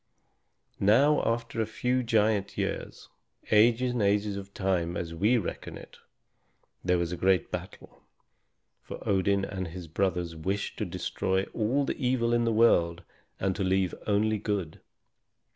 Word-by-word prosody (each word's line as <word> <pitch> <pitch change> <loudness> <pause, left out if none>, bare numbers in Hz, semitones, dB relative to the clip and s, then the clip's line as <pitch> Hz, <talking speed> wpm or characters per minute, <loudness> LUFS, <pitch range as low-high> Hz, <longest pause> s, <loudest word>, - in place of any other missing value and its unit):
Now 135 +9 +4
after 115 -1 -3
a 110 - -1
few 125 +3 0
giant 110 -4 +1
years, - - -4 0.4
ages 115 +3 +4
and 120 -2 -1
ages 100 0 +1
of 100 0 -7
time 90 -3 -1
as 85 -1 -4
we 105 +9 +3
reckon 105 - -5
it, - - -13 0.9
there 90 0 +2
was 85 -1 -1
a - - -2
great 95 +1 +1
battle, - - -8 0.8
for - - -8
Odin 100 0 +2
and 95 -2 -4
his 85 0 -8
brothers 90 0 -1
wished 95 +5 -3
to - - -1
destroy 95 0 -1
all 125 +6 +1
the 135 - -4
evil 120 -2 +1
in 120 0 +2
the 115 - +2
world 90 -7 +3 0.4
and 95 -1 0
to 100 - -1
leave 95 -1 +1
only 105 +1 +2
good. 100 -6 -3
100 Hz, 150 wpm, -28 LUFS, 95-115 Hz, 0.9 s, Now